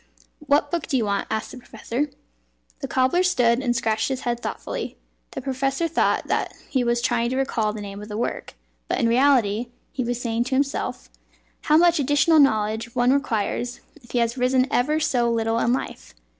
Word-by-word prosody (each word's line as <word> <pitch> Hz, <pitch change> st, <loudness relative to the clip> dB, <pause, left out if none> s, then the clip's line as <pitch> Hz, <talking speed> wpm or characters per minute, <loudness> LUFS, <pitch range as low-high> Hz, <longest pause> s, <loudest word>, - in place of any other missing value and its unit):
"What 295 Hz, -1 st, +1 dB
book 340 Hz, -3 st, -2 dB
do 270 Hz, -, +1 dB
you 230 Hz, -, +1 dB
want?" 200 Hz, -1 st, -1 dB
asked 220 Hz, 0 st, -3 dB
the 255 Hz, -, -9 dB
professor. 245 Hz, +4 st, -4 dB, 0.7 s
The -, -, -4 dB
cobbler 260 Hz, +7 st, +2 dB
stood 250 Hz, -10 st, +3 dB
and 245 Hz, -3 st, 0 dB
scratched 220 Hz, -2 st, 0 dB
his 265 Hz, -1 st, -3 dB
head 240 Hz, -1 st, -2 dB
thoughtfully. -, -, -5 dB, 0.3 s
The 265 Hz, -, -7 dB
professor 270 Hz, +4 st, -1 dB
thought 330 Hz, -, +1 dB
that -, -, -1 dB
he 260 Hz, -3 st, 0 dB
was 240 Hz, 0 st, 0 dB
trying 235 Hz, -1 st, +1 dB
to 260 Hz, -, -2 dB
recall 230 Hz, -5 st, 0 dB
the 210 Hz, 0 st, -7 dB
name 200 Hz, 0 st, -7 dB
of 210 Hz, -, -8 dB
the 210 Hz, -, -4 dB
work; 240 Hz, -, -4 dB, 0.3 s
but -, -, -1 dB
in 230 Hz, -, +2 dB
reality 240 Hz, -3 st, +3 dB, 0.2 s
he 260 Hz, -, -2 dB
was 240 Hz, 0 st, -2 dB
saying 235 Hz, -1 st, -1 dB
to 260 Hz, -, -1 dB
himself: 275 Hz, +1 st, -2 dB, 0.5 s
"How 305 Hz, 0 st, +5 dB
much 345 Hz, -1 st, +4 dB
additional 290 Hz, +3 st, +4 dB
knowledge 220 Hz, -3 st, +1 dB
one 245 Hz, +1 st, +3 dB
requires 240 Hz, -2 st, -1 dB, 0.2 s
if 240 Hz, -, -19 dB
he -, -, -2 dB
has 235 Hz, +1 st, 0 dB
risen 255 Hz, +1 st, +3 dB
ever 300 Hz, +5 st, +2 dB
so 245 Hz, -6 st, +1 dB
little 225 Hz, 0 st, 0 dB
in 235 Hz, -, +2 dB
life! 250 Hz, -, -4 dB
245 Hz, 195 wpm, -23 LUFS, 230-275 Hz, 0.7 s, How